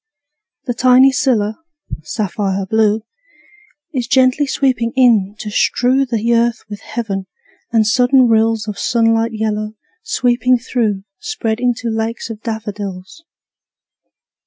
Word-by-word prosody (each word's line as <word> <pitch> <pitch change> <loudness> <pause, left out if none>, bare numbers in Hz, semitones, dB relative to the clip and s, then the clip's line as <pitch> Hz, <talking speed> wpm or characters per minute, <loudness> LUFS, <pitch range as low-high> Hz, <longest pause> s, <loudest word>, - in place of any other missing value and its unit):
The 250 - -2
tiny 255 +2 +5
scilla, 240 -5 0 0.4
sapphire 195 +2 -2
blue, 215 +1 +1 0.9
Is 250 -4 -2
gently 260 +2 +3
sweeping 255 -4 0
in, 220 -6 +3
to 210 -1 -6
strew 260 +5 +1
The 235 -1 0
earth 235 0 +1
with 205 -1 -8
heaven; 200 -5 -5 0.4
and 225 -2 +3
sudden 250 +3 +4
rills 225 -1 +2
Of 210 - -5
sunlit 225 0 +1
yellow, 215 0 -2 0.3
sweeping 250 - +1
through, 225 -5 -2 0.2
Spread 225 - -3
into 240 -2 -1
lakes 225 +1 -3
of 215 -1 -9
daffodils. 210 - -6
225 Hz, 115 wpm, -17 LUFS, 215-250 Hz, 0.9 s, tiny